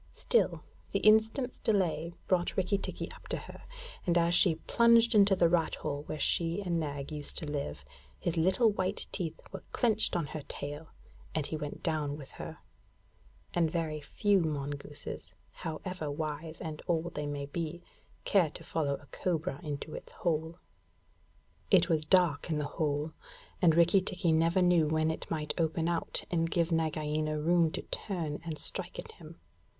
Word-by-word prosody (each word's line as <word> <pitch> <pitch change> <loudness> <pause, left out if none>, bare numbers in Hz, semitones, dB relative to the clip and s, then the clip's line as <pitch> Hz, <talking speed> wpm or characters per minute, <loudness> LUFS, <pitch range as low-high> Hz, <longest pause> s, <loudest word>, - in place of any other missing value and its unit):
Still, 475 - +2 0.3
the - - +3
instant's 220 +4 +4
delay 175 -5 +1
brought 180 -2 +1
Rikki 190 +1 +2
tikki - - -5
up - - -13
to - - -2
her, - - -10 0.4
and 175 -2 +2
as 170 0 +3
she 175 -2 +5
plunged 235 +6 +4
into 200 -2 +6
the 175 -2 +4
rat 165 -1 +2
hole 145 0 -3
where - - -3
she 165 +3 +1
and 175 -4 0
Nag 145 -2 -4
used 150 -1 -6
to - - -3
live, 140 - -4 0.3
his 170 - -2
little 190 +7 +4
white 190 0 -2
teeth 165 -4 -3
were - - -6
clenched 220 -5 +2
on 170 -3 +1
her 150 +1 -6
tail, 145 +3 -6 0.5
and 155 -3 0
he 160 - -3
went 150 -2 -5
down 150 -3 -1
with 140 -3 -10
her - - -7 1.0
and 170 -2 +3
very 155 -2 -2
few 200 +6 +2
mongooses, 145 - -4 0.2
however 165 -1 -5
wise 155 +2 -4
and 155 -2 -5
old 170 -1 0
they 150 0 -3
may 145 -1 -3
be, 165 +3 -4 0.4
care 185 -6 +4
to - - -11
follow 145 -4 0
a 145 - -13
cobra 160 -6 -1
into 150 0 -5
its - - -8
hole. 160 0 -1 1.1
It 180 -2 +5
was 155 -2 +2
dark 170 -3 +3
in 155 - +1
the 150 - -1
hole; 150 +1 -1 0.5
and 165 -4 +6
Rikki 170 +3 +5
tikki 180 -2 0
never 165 +3 +3
knew 175 -3 +4
when 155 +1 +2
it 160 - -6
might 155 -2 -1
open 165 0 +1
out 170 -1 -1
and 165 -1 +1
give 170 0 +1
Nagaina 155 -1 0
room 170 +1 +4
to - - -3
turn 165 -7 -3
and 160 -2 -4
strike - - -4
at - - -7
him. - - -13
165 Hz, 170 wpm, -31 LUFS, 150-180 Hz, 1.1 s, into